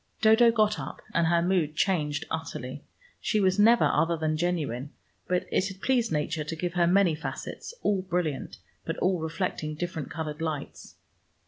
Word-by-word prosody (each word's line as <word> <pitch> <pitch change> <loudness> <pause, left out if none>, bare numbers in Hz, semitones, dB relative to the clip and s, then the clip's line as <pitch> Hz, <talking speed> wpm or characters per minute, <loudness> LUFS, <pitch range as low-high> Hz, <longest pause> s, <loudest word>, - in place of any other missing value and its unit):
Dodo 220 +2 +6
got 215 -2 +2
up, - - -7
and 170 -1 +3
her 170 0 +3
mood 175 -4 +1
changed 150 -7 0
utterly. 145 -4 -5 0.4
She 215 - 0
was 190 0 +2
never 230 +3 +6
other 165 0 +2
than 155 0 0
genuine, 155 -6 -2 0.4
but 180 0 0
it 185 - +2
had 190 -1 -8
pleased 240 -1 +1
Nature 155 +1 -1
to 155 +2 -5
give 175 +1 -3
her 175 -1 +3
many 185 -1 +4
facets, 155 +2 -6
all 200 -2 +2
brilliant, 170 -6 -2 0.3
but - - -4
all 185 -1 +1
reflecting 160 -1 -3
different 160 -2 -4
colored 155 -2 -5
lights. 155 -3 -5
170 Hz, 165 wpm, -28 LUFS, 155-190 Hz, 0.4 s, Dodo